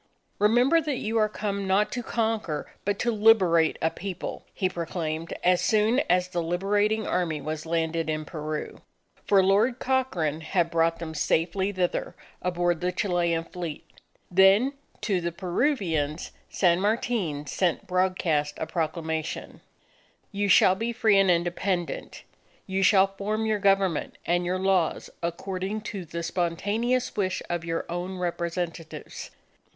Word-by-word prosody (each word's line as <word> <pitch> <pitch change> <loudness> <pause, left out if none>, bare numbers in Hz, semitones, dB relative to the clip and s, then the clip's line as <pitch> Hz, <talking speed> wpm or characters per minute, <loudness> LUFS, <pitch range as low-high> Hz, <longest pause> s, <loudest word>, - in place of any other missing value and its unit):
"Remember 245 +10 +4
that 295 -4 -2
you 225 0 -1
are 215 -1 +3
come 200 -2 -3
not 205 +3 +2
to 245 - -3
conquer 220 -9 -2
but 205 0 0
to 240 - 0
liberate 195 -7 +4
a 160 - +2
People!" 190 -1 -6
he 185 - 0
proclaimed 165 -2 -4
as 180 0 +4
soon 220 +4 +3
as 180 0 +2
the 175 -1 -1
Liberating 205 +5 +1
Army 165 -4 -1
was 155 +2 -5
landed 165 0 -1
in 155 0 -2
Peru. 155 -2 -5 0.5
For 195 -2 +5
Lord 210 +6 +3
Cochrane 190 - 0
had 170 +1 0
brought 165 0 +2
them 165 -1 -6
safely 170 +6 0
thither 185 -3 -2 0.3
aboard 175 -1 0
the 180 0 0
Chilean 175 -3 0
fleet. 170 -2 -6 0.5
Then 195 +8 +5 0.3
to 190 -4 0
the 170 0 -2
Peruvians, 175 - -1 0.2
San 175 -2 +3
Martin 205 -8 -1
sent 175 +3 0
broadcast 180 -5 0
a - - -3
proclamation: 160 -1 -3 0.7
_You 200 0 0
shall 185 - +6
be 230 +5 -2
free 220 -4 +3
and 195 -1 +4
independent. 175 +1 -1 0.4
You 190 0 -1
shall 195 0 +6
form 200 +3 -3
your 215 -1 +1
government 195 -4 +1
and 175 +1 +1
your 185 +1 0
laws 190 -3 0
according 190 +4 -3
to 190 -3 -5
the 170 +1 -5
spontaneous 205 +9 -1
wish 185 -2 -1
of 175 -1 -2
your 165 0 -2
own 180 +2 -4
representatives. 170 -2 -4
180 Hz, 140 wpm, -26 LUFS, 170-205 Hz, 0.7 s, shall